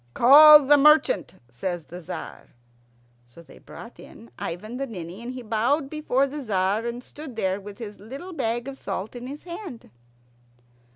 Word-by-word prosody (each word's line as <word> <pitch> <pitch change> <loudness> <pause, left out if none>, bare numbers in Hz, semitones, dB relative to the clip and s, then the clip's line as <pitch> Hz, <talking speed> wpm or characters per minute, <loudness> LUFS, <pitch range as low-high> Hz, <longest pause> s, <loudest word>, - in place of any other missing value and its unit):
"Call 300 +3 +8
the 290 +2 +6
merchant," 305 - +3 0.2
says 170 +6 -5
the 175 +1 -10
Tzar. 160 - -9 0.7
So 120 +8 -16
they - - -17
brought - - -13
in 115 - -14
Ivan 215 +8 -6
the 275 +1 -3
Ninny, 180 -2 -8
and 240 +1 -6
he 255 -1 -8
bowed 240 +6 0
before 285 -3 0
the 290 +2 -6
Tzar, 205 0 -1
and 240 +1 -6
stood 290 -3 -10
there 190 -2 -2
with 200 0 -11
his 210 -3 -9
little 275 - -9
bag 235 -4 -2
of 275 -1 -7
salt 205 +6 -5
in 245 +1 -7
his 285 +3 -9
hand. 345 - -9
240 Hz, 170 wpm, -24 LUFS, 200-285 Hz, 0.7 s, Call